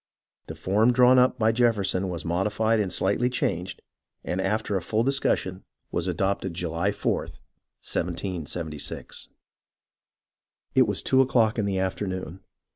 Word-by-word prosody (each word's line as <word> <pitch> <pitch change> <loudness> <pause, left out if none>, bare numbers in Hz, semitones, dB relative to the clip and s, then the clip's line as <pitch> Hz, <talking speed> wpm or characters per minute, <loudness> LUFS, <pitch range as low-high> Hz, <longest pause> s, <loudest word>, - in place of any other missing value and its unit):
The - - -7
form 110 +6 +2
drawn 125 +1 +6
up 125 0 +3
by 110 -2 +3
Jefferson 105 -5 +1
was 85 -1 -5
modified 105 +6 +1
and 100 -4 -1
slightly 100 +8 +2
changed, 90 -7 -2 0.4
and 90 +2 -2
after 105 +2 -1
a 95 - 0
full 110 +6 0
discussion, 120 -8 0 0.3
was 85 +1 -1
adopted, 95 0 -1
July 85 +2 -1
4th, 100 - -2 0.5
1776. 85 -3 -4 1.4
It 130 -3 +5
was 105 -2 -1
two 130 0 +4
o'clock 115 -4 +2
in 105 - +1
the 100 -1 -1
afternoon. 95 -1 -3
100 Hz, 130 wpm, -26 LUFS, 90-115 Hz, 1.4 s, drawn